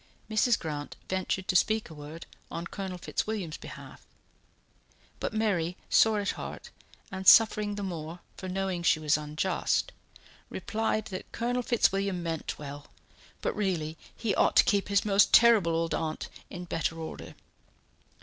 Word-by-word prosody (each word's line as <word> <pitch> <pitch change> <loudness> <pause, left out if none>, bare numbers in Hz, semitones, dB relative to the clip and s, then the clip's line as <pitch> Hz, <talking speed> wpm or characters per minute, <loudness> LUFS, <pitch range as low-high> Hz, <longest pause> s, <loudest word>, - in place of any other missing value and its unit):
Mrs. 220 +2 +3
Grant 150 -3 -5
ventured 190 +1 -1
to 185 - +1
speak 220 +4 +3
a 160 - -11
word 150 +2 -9 0.2
on 170 +1 -5
Colonel 190 0 -5
Fitzwilliam's 185 -3 -3
behalf, - - -11 1.2
but - - -2
Mary, 190 -6 0
sore 220 -1 +5
at 205 - 0
heart - - -8 0.4
and 190 -1 -5
suffering 210 -2 +6
the 205 - -4
more 165 -3 -5 0.2
for 185 - -7
knowing 190 -1 -2
she 165 -2 +3
was 150 -1 +2
unjust, 155 - -1 0.6
replied 220 0 -1
that 185 - -6
Colonel 245 +2 -1
Fitzwilliam 195 -6 +1
meant 165 -2 -3
well, 145 0 -8 0.6
but - - -1
really 175 -7 -1 0.2
he 220 -4 -1
ought - - +3
to - - +8
keep 200 -1 +1
his 200 0 +2
most 200 -1 +5
terrible 225 -8 +6
old 165 0 0
aunt 155 -1 -3 0.2
in 180 -1 -7
better 165 -1 -2
order. 160 -1 -7
185 Hz, 150 wpm, -29 LUFS, 165-210 Hz, 1.2 s, to